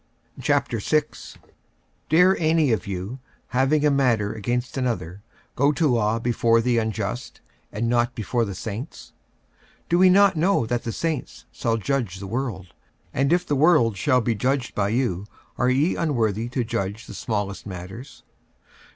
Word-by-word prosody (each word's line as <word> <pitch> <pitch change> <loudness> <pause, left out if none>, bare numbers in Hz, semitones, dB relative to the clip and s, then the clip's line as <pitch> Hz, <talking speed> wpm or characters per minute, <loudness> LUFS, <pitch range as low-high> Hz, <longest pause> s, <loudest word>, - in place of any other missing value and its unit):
46:006:001 150 +7 -1 0.7
Dare 180 +4 +5
any 160 -4 +3
of 105 -5 -1
you, 100 +6 -5 0.3
having 135 +4 +2
a 150 - +4
matter 120 -7 +2
against 120 +4 -3
another, 115 -8 -3 0.3
go 140 +3 +3
to 155 +1 +1
law 115 -4 +2
before 115 -1 +2
the 120 0 +2
unjust, 110 +1 -4 0.3
and 115 +3 -2
not 120 +1 +1
before 115 +2 -1
the 100 -4 -4
saints? 110 - -7 0.7
46:006:002 - - -39
Do 175 +1 +3
ye 185 - +7
not 200 0 +5
know 170 -4 +2
that 120 +1 -2
the 115 - -2
saints 160 +1 -4
shall 115 -1 -1
judge 115 -5 -2
the 100 - -7
world? 105 -4 -4 0.4
and 135 +3 +1
if 175 +1 +2
the 145 - 0
world 140 - +4
shall 125 +7 +2
be 115 +1 0
judged 130 +4 -1
by 100 -1 0
you, 105 -5 -1 0.3
are 125 - +3
ye 140 +7 +2
unworthy 115 - 0
to 125 0 -1
judge 110 -2 -3
the - - -10
smallest 105 -3 -3
matters? 95 +8 -9
120 Hz, 160 wpm, -24 LUFS, 105-140 Hz, 0.7 s, ye